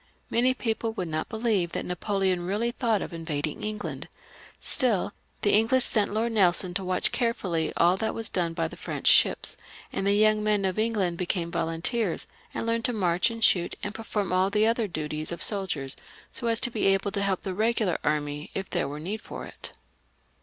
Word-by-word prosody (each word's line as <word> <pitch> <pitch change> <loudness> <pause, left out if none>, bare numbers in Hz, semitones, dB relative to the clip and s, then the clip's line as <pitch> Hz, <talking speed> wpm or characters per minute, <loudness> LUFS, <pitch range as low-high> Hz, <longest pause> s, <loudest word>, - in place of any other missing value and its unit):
Many 255 +2 +3
people 225 -2 -2
would 180 -6 -4
not 155 0 -2
believe 220 -7 0
that - - -2
Napoleon 185 0 0
really 215 +5 0
thought 230 -4 0
of - - -7
invading 160 +1 -3
England; 210 0 -4 0.5
still, 215 -6 +2 0.3
the 205 - +3
English 230 +5 +4
sent 210 -3 +2
Lord 225 +3 0
Nelson 185 -3 +3
to 195 +1 -2
watch 185 0 0
carefully 190 -9 0
over - - -6
all 175 +2 +4
that 220 +2 -1
was 225 -1 0
done 170 -3 -1
by 165 -1 0
the - - -10
French - - -6
ships, - - +4 0.4
and 195 - -1
the 200 - +4
young 215 0 +4
men 210 -2 +2
of 190 +2 -1
England 205 -6 0
became 175 -2 -1
volunteers, 170 +5 0 0.3
and - - -3
learned 230 0 0
to 245 - 0
march 180 -2 +2
and 230 0 -5
shoot 175 -4 +3
and 205 - -3
perform 210 -4 -3
all 185 +1 +3
the 215 +2 +3 0.2
duties 155 0 -2
of 170 - -3
soldiers, 180 -10 -2 0.4
so 235 - -3
as 230 0 +3
to 240 - +2
be 220 - +1
able 195 +1 +2
to 200 - -1
help 195 -2 0
the 195 - -3
regu 220 +3 +1
lar 180 - 0
army 150 0 -1
if 195 0 -4
there 175 -6 0
was 145 +2 -6
need 210 +5 -4
for - - -8
it. - - -9
195 Hz, 200 wpm, -27 LUFS, 175-220 Hz, 0.5 s, English